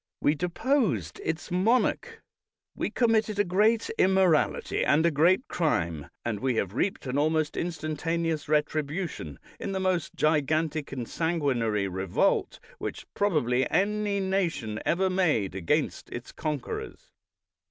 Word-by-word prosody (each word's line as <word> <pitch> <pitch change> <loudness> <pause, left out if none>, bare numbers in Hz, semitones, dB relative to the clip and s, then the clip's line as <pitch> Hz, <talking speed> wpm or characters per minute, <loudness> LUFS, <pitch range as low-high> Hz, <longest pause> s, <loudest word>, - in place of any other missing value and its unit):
We 145 - +3
deposed 175 - 0
its 160 +3 -3
monarch; 245 - +1 0.5
we - - -2
committed 225 -3 +1
a 205 - +4
great 210 +5 +2
im 190 +1 +4
morality 180 -5 +2
and 160 +3 +3
a 170 - +4
great 175 - +3
crime, 85 - -1 0.2
and 115 -3 -2
we 130 +2 0
have 100 -3 -1
reaped 185 - -1
an 130 +2 -1
almost 155 0 +1
instantaneous 165 -1 -2
retribution 150 - -1 0.2
in 195 - -4
the 190 - -1
most 185 -4 -1
gigantic 155 0 +1
and 125 -4 -4
sanguinary 130 - 0
revolt 95 0 0 0.2
which - - -5
probably 130 - +1
any 205 0 +1
nation 175 - -1
ever 190 +3 +2
made 170 - +1
against 90 -3 -1
its - - -7
conquerors. 150 -4 -5
160 Hz, 130 wpm, -27 LUFS, 135-190 Hz, 0.5 s, a